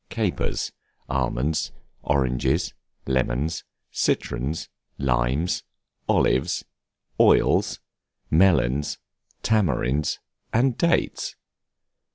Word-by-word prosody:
CAPERS, - - -1 0.4
ALMONDS, 70 +3 0 0.3
ORANGES, 65 -3 +1 0.3
LEMONS, 65 +4 0 0.3
CITRONS, 70 +7 -1 0.3
LIMES, 65 +5 +1 0.5
OLIVES, 65 - +2 0.5
OILS, - - +4 0.5
MELONS, 75 -5 +3 0.5
TAMARINDS, 75 - +1 0.3
AND 125 +2 +3
DATES. 170 0 +1
70 Hz, 60 wpm, -25 LUFS, 65-85 Hz, 0.5 s, OILS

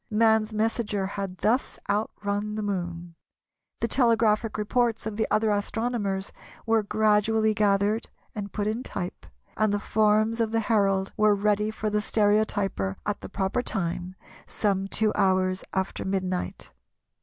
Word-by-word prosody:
Man's 220 0 +3
messenger 215 -2 -1
had 195 -1 -5
thus 235 +7 +1
outrun 205 0 -2
the 215 - -3
Moon. 175 -4 -4 0.7
The 230 - +1
telegraphic 225 -3 +2
reports 230 +1 0
of 220 -1 -3
the 220 - 0
other 215 0 +2
astronomers 205 -2 -1 0.3
were 225 -1 +3
gradually 215 +1 +2
gathered 205 +1 +1 0.2
and 205 -2 -5
put 205 - -2
in 220 +3 -1
type, 180 -8 -6 0.3
and 215 -1 +2
the 205 - 0
forms 215 +2 +2
of 225 -1 +1
the 225 - +2
Herald 195 -3 +1
were 215 -1 +4
ready 210 +1 +1
for 215 -1 -3
the 210 0 +1
stereotyper 205 - +1
at 210 -1 -2
the - - -8
proper 195 +5 -1
time, 180 -4 -3 0.3
some 195 -2 0
two 215 +2 +1
hours 185 -1 +1
after 190 0 -2
midnight. 185 -1 -3
210 Hz, 145 wpm, -26 LUFS, 195-220 Hz, 0.7 s, were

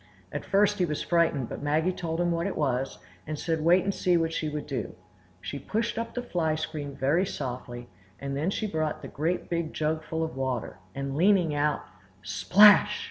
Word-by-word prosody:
At - - -4
first 205 +1 +2
he 180 - +3
was 150 -3 -3
frightened, 165 -7 +2
but - - -6
Maggie 155 +5 +1
told 165 -2 -4
him 175 0 +2
what 170 +2 0
it 200 - -4
was, 135 -3 -1 0.3
and 155 0 -3
said 160 0 -1
wait 175 +2 +5
and 200 +1 0
see 180 -2 +2
what 165 -1 0
she 155 -1 -1
would 150 0 -4
do. 130 -6 -4 0.5
She 95 +11 -5
pushed 225 - -2
up 230 0 -5
the 245 - -2
fly 165 -8 0
screen 150 -3 -5
very 140 +7 +2
softly, 125 -7 -5 0.3
and 140 0 -4
then 150 +6 0
she 215 - -2
brought 155 -6 -2
the - - -5
great 165 +5 -2
big 170 -2 -2
jug 155 +1 0
full 160 0 -2
of 160 - -4
water, 130 -1 -3 0.2
and 140 0 -3
leaning 180 -1 +4
out,—splash! 145 - +3
160 Hz, 195 wpm, -27 LUFS, 140-180 Hz, 0.5 s, wait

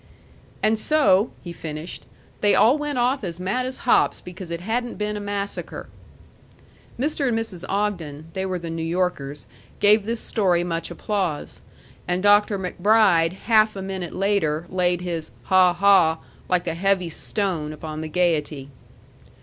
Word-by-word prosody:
"And 215 0 +3
so," 225 -8 +3
he 175 - -7
finished, 155 0 -7 0.3
"they 205 - +4
all 245 +5 +5
went 295 -2 -3
off 250 +1 +1
as 175 -2 -5
mad 245 +8 -1
as 260 - -5
hops - - +3
because 180 0 -9
it 170 0 -4
hadn't 235 +5 -2
been 210 0 -2
a - - -3
massacre." 205 0 -5 1.1
Mr. 290 +1 0
and 235 -2 +1
Mrs. 210 -6 -3
Ogden 175 -8 -2
they 190 - -2
were 185 -1 -2
the 170 -1 -6
New 165 0 -4
Yorkers 165 -4 -2 0.3
gave 205 0 +5
this 230 +1 -2
story 185 -7 +1
much 170 -1 -3
applause, 190 -8 -3 0.5
and 180 +2 -1
Dr. 205 0 +4
MacBride 185 -2 +3
half 215 -2 +4
a 195 - -5
minute 190 -3 -5
later 180 -6 0
laid 180 -1 +1
his 170 -3 -4
"ha 185 -1 +5
ha," 175 -3 +4 0.3
like 180 -1 +1
a 165 - -1
heavy 185 0 +1
stone, 165 -3 -2
upon 155 0 -6
the 160 - -4
gayety. 155 -5 0
185 Hz, 155 wpm, -23 LUFS, 170-210 Hz, 1.1 s, all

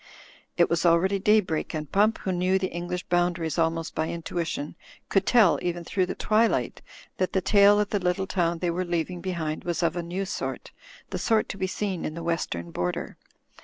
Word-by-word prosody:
It 170 - +5
was 170 -1 0
already 180 +3 +3
daybreak, 190 -6 +1
and 150 -2 -5
Pump, 215 +3 +3
who 190 - -2
knew 185 +1 +2
the 190 -1 -2
English 175 +1 -4
boundaries 175 -3 0
almost 165 0 0
by 160 0 -1
intuition, 165 -3 -4 0.3
could 195 -1 +1
tell 220 -8 +5
even 175 -1 -2
through 185 +2 0
the - - -4
twilight 220 +2 +1 0.4
that 185 - -1
the 190 - +3
tail 200 +2 +5
of 210 -1 0
the 205 - +1
little 180 +1 0
town 175 -3 0
they 175 0 -1
were 180 +2 -1
leaving 175 0 -2
behind 165 -4 -3
was 175 0 -2
of 165 0 +1
a 175 - -1
new 180 +3 -3
sort, - - -5 0.4
the - - -3
sort 220 -2 +2
to - - -5
be 190 - 0
seen 190 -2 -3
in 155 - -4
the 170 - -6
western 85 - -2
border. 90 +1 -3
175 Hz, 200 wpm, -26 LUFS, 165-190 Hz, 0.4 s, It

